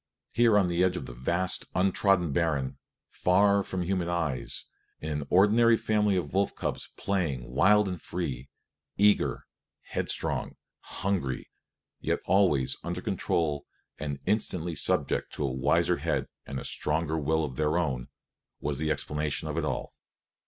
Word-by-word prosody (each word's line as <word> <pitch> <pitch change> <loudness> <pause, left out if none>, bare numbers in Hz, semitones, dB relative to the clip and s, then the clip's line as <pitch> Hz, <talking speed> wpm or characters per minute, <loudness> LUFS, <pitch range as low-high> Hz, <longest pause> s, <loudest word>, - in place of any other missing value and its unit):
Here 115 -3 +4
on 100 - +4
the 85 +1 +1
edge 90 -1 +2
of - - -5
the - - -8
vast, 85 +9 0
untrodden 95 -2 +3
barren, 70 -4 0 0.3
far 100 +2 +3
from 95 -2 -3
human 90 -1 -1
eyes, 80 -7 -2 0.3
in 75 -1 -3
an 70 - -8
ordinary 115 +5 +5
family 105 -3 +2
of 80 -6 -3
wolf 100 +1 +1
cubs - - -3
playing 80 -11 -1
wild 105 +9 +4
and 90 -3 -4
free, 70 -7 -4 0.5
eager, 105 +1 +3 0.4
headstrong, - - -2 0.2
hungry, 90 -10 -3 0.5
yet - - 0
always 90 -10 +3
under 85 +1 -3
control 85 -7 -1 0.3
and 70 -2 -3
instantly 90 -5 0
subject 70 - 0
to - - -3
a 65 - -1
wiser 65 - +2
head - - -1 0.2
and 70 - -4
a - - -7
stronger 80 +1 0
will 80 +1 +1
than 65 - -8
their 75 +2 +1
own, 65 -8 -1 0.5
was 70 -2 -2
the 80 0 0
explanation 75 0 -1
of - - -3
it - - 0
all. - - -3
85 Hz, 150 wpm, -28 LUFS, 75-95 Hz, 0.5 s, ordinary